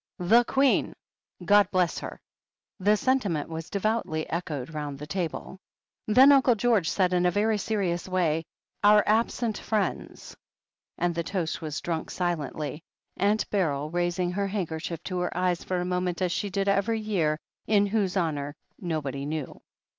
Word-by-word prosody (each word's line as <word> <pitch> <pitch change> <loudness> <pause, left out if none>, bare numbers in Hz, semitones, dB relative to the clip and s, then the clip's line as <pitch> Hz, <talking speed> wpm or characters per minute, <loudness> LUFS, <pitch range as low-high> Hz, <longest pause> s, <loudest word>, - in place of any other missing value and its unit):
"The 225 +7 +5
Queen! 270 +2 +2 0.5
God 205 +1 +5
bless 180 -3 +1
her." - - -7 0.6
The 205 +3 +3
sentiment 205 - 0
was 160 0 -6
devoutly 200 -6 -1
echoed 160 -4 -4
round 145 -2 -4
the 150 - -7
table. 175 +2 -4 0.5
Then 260 +6 +7
Uncle 265 -3 +5
George 220 -6 +2
said 185 -2 +1
in 180 0 +3
a - - +5
very 210 +3 +1
serious 190 -5 -1
way: 165 -4 +1 0.4
"Our 210 0 +7
absent 225 +1 +1
friends." 210 -4 -3 0.6
And 175 0 0
the 170 - -1
toast 170 -1 -3
was 155 0 -4
dnmk 165 -2 -3
silently, 155 -3 -3 0.4
Aunt 205 +2 +1
Beryl 155 -7 0
raising 175 +1 0
her 200 +2 -1
handkerchief 170 -4 -4
to 185 -2 -3
her 180 -1 -2
eyes 180 -1 0
for 185 -1 -2
a 175 - -2
moment 180 -1 -1
as 180 - +1
she 205 +2 -2
did 195 +1 -1
every 200 +3 +2
year, 170 -8 0 0.3
in 205 -2 +4
whose 200 -2 0
honour 145 -4 -1 0.2
nobody 145 -6 -3
knew. 155 -3 -5
180 Hz, 155 wpm, -27 LUFS, 160-205 Hz, 0.6 s, Then